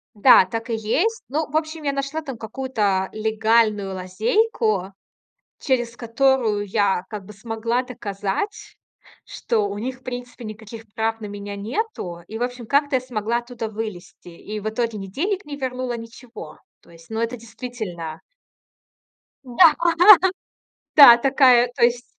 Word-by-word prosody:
Да, 205 -3 +7
так 225 +5 -5
и 230 - 0
есть. 320 - -1
Ну, 300 +2 -2
в 310 - 0
общем, 315 0 -4
я 280 - 0
нашла 275 +3 -3
там 270 -6 -7
какую-то 220 -6 -1
легальную 215 -2 +1
лазейку, 210 - 0 0.7
через 240 -4 -1
которую 235 -3 +1
я 195 -2 +1
как 210 -3 -7
бы 210 - -11
смогла 230 +3 -2
доказать, 210 - -5 0.5
что 215 -3 -1
у 200 - -5
них, 255 +4 -4
в - - -32
принципе, 245 -1 -7
никаких 220 +1 -9
прав 225 0 -1
на 220 - -7
меня 205 0 -7
нету. 220 - -4
И, 220 - -6
в 240 - -2
общем, 245 -1 -5
как-то 285 +1 +2
я 255 - +1
смогла 235 -2 -2
оттуда 240 -2 -6
вылезти. 195 -5 -8
И 210 +5 -7
в 215 - -2
итоге 230 0 -2
ни 195 -1 -7
денег 370 - -2
не 290 -1 -7
вернула, 255 -2 -3
ничего. 230 -6 -11 0.2
То - - -23
есть, 165 +2 -17
ну, 220 - -4
это 230 +2 -1
действительно 215 -9 -7 1.2
Да. 285 +6 +5 1.2
Да, 260 -6 +10
такая 255 -1 +4
то - - +1
есть 240 0 +2
230 Hz, 150 wpm, -22 LUFS, 210-255 Hz, 1.2 s, Да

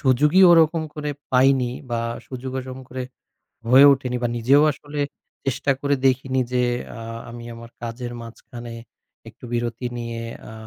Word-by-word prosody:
সুযোগই 150 +8 +4
ওরকম 165 -1 +5
করে 150 -1 -3 0.2
পাইনি 130 -1 +4 0.2
বা 120 - 0 0.3
সুযোগও 130 0 -5
ওজম 130 0 -8
করে 130 0 -5 0.7
হয়ে 130 +3 +8
ওঠেনি 130 -2 -2
বা 120 - +1
নিজেও 135 +5 +4
আসলে 145 +1 -7 0.4
চেষ্টা 135 +1 -1
করে 140 0 +1
দেখিনি 130 0 +1
যে 125 0 +2 0.4
আ - - -8 0.3
আমি 120 0 -9
আমার 115 0 -11
কাজের 120 +1 -5
মাঝখানে 120 +1 -10 0.6
একটু 115 +3 -15
বিরতি 120 +1 -2
নিয়ে 115 -1 -5 0.3
আ - - -10
130 Hz, 145 wpm, -23 LUFS, 120-140 Hz, 0.7 s, হয়ে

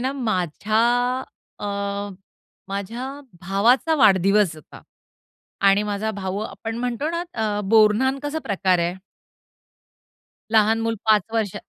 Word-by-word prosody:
ना 260 +2 -1
माझ्या 215 - -1 0.8
अ, - - -5 1.0
माझ्या 205 +6 -4 0.3
भावाचा 225 - +2
वाढदिवस 195 - +4
होता 155 - -14 0.9
आणि 200 +1 +4
माझा 210 +1 -2
भाऊ 195 -2 -4
आपण 225 +1 -6
म्हणतो 250 +5 -2
ना 340 +1 -2
अ, 215 -2 -1
बोरन्हांन 225 +5 +4
कसा 290 +2 -3
प्रकार 190 -3 +1
आहे. 170 +1 0 1.6
लहान 220 +1 +4
मुल 225 0 -1
5 215 -2 +5
वर्ष, 220 -4 -1
215 Hz, 115 wpm, -22 LUFS, 195-235 Hz, 1.6 s, 5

